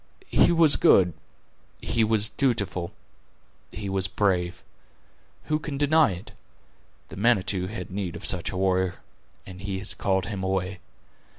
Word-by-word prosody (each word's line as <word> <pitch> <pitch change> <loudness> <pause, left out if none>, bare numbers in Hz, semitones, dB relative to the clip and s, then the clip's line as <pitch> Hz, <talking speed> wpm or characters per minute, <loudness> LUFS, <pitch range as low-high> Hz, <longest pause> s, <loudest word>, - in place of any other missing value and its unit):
He - - +5
was 165 -3 +5
good; 90 - +5 0.7
he 115 -1 0
was 110 0 +1
dutiful; 100 - -1 0.8
he 105 - -6
was 95 0 +1
brave. 90 -3 -1 0.8
Who 155 0 -1
can 150 -2 -5
deny 145 -4 +4
it? 90 +4 -10 0.8
The - - -10
Manitou 100 -4 +2
had 95 -3 -7
need 95 -3 -4
of - - -8
such 90 -3 0
a 95 - -5
warrior, 95 -1 +1 0.5
and 95 0 -10
He 100 -1 -3
has 95 +2 -3
called 95 -2 0
him 100 -3 -5
away. 95 0 -2
95 Hz, 140 wpm, -26 LUFS, 95-110 Hz, 0.8 s, He